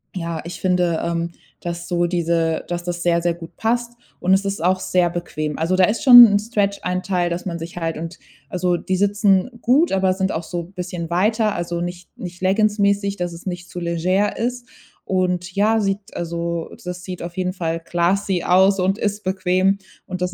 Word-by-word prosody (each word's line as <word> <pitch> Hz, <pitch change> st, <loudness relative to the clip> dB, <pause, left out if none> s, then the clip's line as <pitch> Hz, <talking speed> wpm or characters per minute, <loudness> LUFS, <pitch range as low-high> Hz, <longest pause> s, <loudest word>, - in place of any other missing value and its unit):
ja, 165 Hz, -3 st, -3 dB
ich 170 Hz, -, -7 dB
finde, 180 Hz, -3 st, +1 dB
ähm, 170 Hz, 0 st, -2 dB, 0.3 s
dass 175 Hz, 0 st, -5 dB
so 175 Hz, -1 st, +1 dB
diese 170 Hz, -2 st, 0 dB
dass 175 Hz, 0 st, -3 dB
das 175 Hz, 0 st, -4 dB
sehr, 170 Hz, -1 st, +2 dB
sehr 175 Hz, -1 st, +2 dB
gut 170 Hz, 0 st, -12 dB
passt. 235 Hz, +1 st, -1 dB, 0.3 s
Und 185 Hz, +1 st, +2 dB
es 195 Hz, +1 st, -1 dB
ist 195 Hz, -3 st, -3 dB
auch 185 Hz, +1 st, +2 dB
sehr 180 Hz, -2 st, +1 dB
bequem. 155 Hz, -3 st, -4 dB
Also, 165 Hz, +3 st, +1 dB
da 185 Hz, 0 st, +5 dB
ist 210 Hz, +5 st, -1 dB
schon 245 Hz, -2 st, +11 dB
'n 205 Hz, -1 st, +3 dB
Stretch-Anteil, 195 Hz, -4 st, -1 dB
dass 175 Hz, +2 st, -4 dB
man 170 Hz, -2 st, -3 dB
sich 170 Hz, +1 st, -8 dB
halt 165 Hz, -1 st, -2 dB
und, 165 Hz, +2 st, -7 dB, 0.3 s
also, 180 Hz, +2 st, 0 dB
die 185 Hz, -, -2 dB
sitzen 200 Hz, +1 st, +2 dB
gut, 280 Hz, +8 st, +4 dB
aber 190 Hz, -1 st, +2 dB
sind 190 Hz, 0 st, -1 dB
auch 160 Hz, -, -3 dB
so 170 Hz, +1 st, -4 dB
bisschen 180 Hz, -2 st, -6 dB
weiter. 210 Hz, +5 st, +1 dB
Also, 170 Hz, 0 st, -3 dB
nicht 175 Hz, 0 st, -6 dB
nicht 180 Hz, 0 st, -8 dB
leggingsmäßig, 200 Hz, 0 st, +2 dB
dass 175 Hz, -1 st, -3 dB
es 170 Hz, +3 st, -11 dB
nicht 180 Hz, -1 st, -5 dB
zu 180 Hz, -, -5 dB
leger 180 Hz, +4 st, 0 dB
ist. 245 Hz, +1 st, -3 dB, 0.4 s
Und, 180 Hz, -1 st, -1 dB
ja, 215 Hz, +3 st, +3 dB
sieht 195 Hz, 0 st, -3 dB
also, 170 Hz, 0 st, -3 dB, 0.2 s
das 180 Hz, 0 st, -6 dB
sieht 180 Hz, -1 st, -6 dB
auf 170 Hz, 0 st, -7 dB
jeden 185 Hz, -1 st, -1 dB
Fall 165 Hz, -3 st, -2 dB
classy 175 Hz, +2 st, 0 dB
aus 190 Hz, +2 st, +4 dB
und 190 Hz, +3 st, +1 dB
ist 210 Hz, 0 st, -2 dB
bequem. 185 Hz, +1 st, +1 dB, 0.3 s
Und 185 Hz, -1 st, -6 dB
das 180 Hz, 0 st, -1 dB
180 Hz, 195 wpm, -21 LUFS, 170-195 Hz, 0.4 s, schon